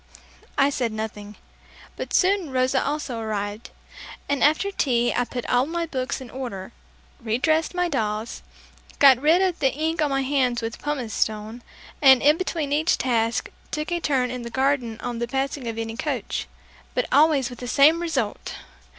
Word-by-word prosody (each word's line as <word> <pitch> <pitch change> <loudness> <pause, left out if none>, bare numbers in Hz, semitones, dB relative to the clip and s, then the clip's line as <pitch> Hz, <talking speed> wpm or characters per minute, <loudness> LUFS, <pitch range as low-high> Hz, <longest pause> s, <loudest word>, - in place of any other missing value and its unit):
I 275 +1 +4
said 245 -4 -1
nothing, 210 -1 -6 0.6
but - - -6
soon 380 -3 +2
Rosa 260 0 +1
also 285 -5 -3
arrived, 210 0 -4 0.6
and 285 -1 0
after 315 +7 +3
tea 240 -9 +1
I 245 - +1
put 245 0 -5
all 250 +2 +2
my 340 +1 -2
books 260 -5 -3
in 260 -3 -10
order, 240 -8 -6 0.5
redressed 295 +10 0
my 355 0 +1
dolls, 220 -6 -2 0.6
got 265 -3 +7
rid 325 +6 +4
of 365 -2 0
the 270 -2 +2
ink 315 +2 -1
on 300 - +2
my 270 0 0
hands 260 -3 +1
with 225 0 -5
pumice 265 -7 -3
stone, 215 +2 -2 0.4
and 265 -3 +7
in 295 +2 +6
between 320 -6 -2
each 315 +4 +2
task, 235 -2 0 0.2
took 305 +2 -4
a 345 - 0
turn 260 -6 0
in 250 -1 -5
the 235 - -6
garden 255 -2 0
on 240 -1 -4
the 235 - -2
passing 270 0 -2
of 225 -1 -4
any 225 0 -4
coach - - -3 0.5
but - - +1
always 285 -4 +4
with 245 - -10
the 245 - -6
same 300 +7 +5
result! 265 -11 -2
260 Hz, 175 wpm, -24 LUFS, 235-300 Hz, 0.6 s, got